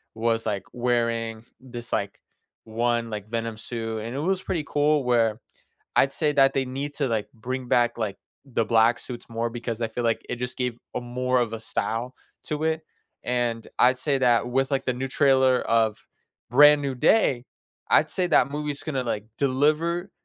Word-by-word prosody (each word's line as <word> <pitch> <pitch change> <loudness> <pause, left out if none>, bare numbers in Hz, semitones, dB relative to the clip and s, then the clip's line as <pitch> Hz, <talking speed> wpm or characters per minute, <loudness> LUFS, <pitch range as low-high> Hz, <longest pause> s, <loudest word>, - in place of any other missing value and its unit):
was, 115 0 0
like, 100 -2 -2
wearing 115 -2 -1 0.2
this, 120 -2 -9
like, 100 -1 -2 0.4
one, 115 +1 -1
like, 105 -1 -6
Venom 115 -1 -3
suit, 115 -1 -4
and 115 +3 -5
it - - -2
was 185 +4 0
pretty 170 -5 -2
cool 145 0 +2
where 115 -3 +2 0.6
I'd 135 - +4
say 150 -2 +1
that 135 -1 +4
they 135 -1 0
need 140 +3 -4
to, 140 - 0
like, 110 -3 -2
bring 125 +2 -5
back, 120 -1 +2
like, 105 -4 -3 0.3
the 120 -4 0
black 115 +1 +3
suits 120 -2 -8
more 115 +1 -2
because 120 -1 -5
I 115 - +1
feel 120 +2 -4
like 115 -1 0
it 120 - -3
just 125 0 -5
gave 125 -2 -2 0.2
a - - -1
more 125 +1 0
of 120 -2 0
a 115 - -4
style 115 +2 -3 0.3
to 150 0 -3
it, 160 0 0 0.4
and 120 -2 -1
I'd 125 +1 +5
say 140 +1 0
that 120 -2 +3
with, 135 +2 0
like, 135 -1 0
the 130 - +1
new 130 +2 -3
trailer 130 -2 +4
of 110 -2 +1 0.4
Brand 145 +3 +7
New 135 -2 -2
Day, 130 - +3 0.4
I'd - - +4
say 180 -1 0
that 140 -5 +3
movie's 150 -1 -4
gonna, 135 -5 -2
like, 105 -4 -3
deliver 155 +7 +1
125 Hz, 185 wpm, -25 LUFS, 115-135 Hz, 0.6 s, Brand